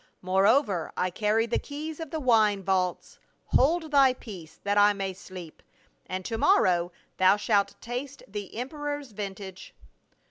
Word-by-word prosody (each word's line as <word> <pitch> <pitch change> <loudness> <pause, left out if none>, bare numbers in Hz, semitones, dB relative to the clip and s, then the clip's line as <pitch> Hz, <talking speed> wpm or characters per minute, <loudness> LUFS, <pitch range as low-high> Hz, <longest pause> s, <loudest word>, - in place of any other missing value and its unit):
Moreover, 190 - +2
I 180 0 0
carry 215 +4 +1
the 235 - 0
keys 305 +2 -7
of 325 -2 -6
the 320 +1 -3
wine 215 -7 +3
vaults; 185 -1 -1 0.3
hold 315 +3 +2
thy 270 -3 +5
peace 185 -10 -11
that 205 0 0
I 205 0 +6
may 195 -1 -3
sleep, 185 -3 -11 0.5
and 185 0 -4
to 225 -2 -3
mor - - +5
row 175 -1 +1 0.3
thou 185 +2 +5
shalt 205 -1 +1
taste 255 +4 -6
the 205 -1 -7
emperor's 290 +2 -4
vintage." 195 -2 -7
210 Hz, 150 wpm, -27 LUFS, 190-265 Hz, 0.5 s, I